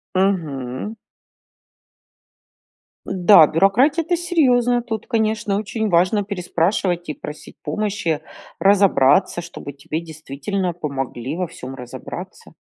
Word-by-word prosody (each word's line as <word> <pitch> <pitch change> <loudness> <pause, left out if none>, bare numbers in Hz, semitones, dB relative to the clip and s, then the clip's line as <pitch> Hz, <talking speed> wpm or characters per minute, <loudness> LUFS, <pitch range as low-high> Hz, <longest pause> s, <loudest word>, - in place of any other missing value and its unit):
Мгм. 160 - -1 2.1
Да, 180 -3 +6
бюрократия 220 - +3
это 350 +2 0
серьёзно. 255 -9 +2
Тут 225 -3 -5
конечно 220 -3 0
очень 220 +1 -2
важно 185 +3 +3
переспрашивать 180 -2 -1
и 150 - -3
просить 150 +1 -10
помощи 205 -7 -1 0.4
разобраться, 190 -5 +4
чтобы 170 -4 -8
тебе 140 +3 -5
действительно 160 +3 -4
помогли 140 -4 -4
во 180 -2 -2
всём 130 -2 -9
разобраться. 125 -2 -9
185 Hz, 100 wpm, -21 LUFS, 155-215 Hz, 2.1 s, Да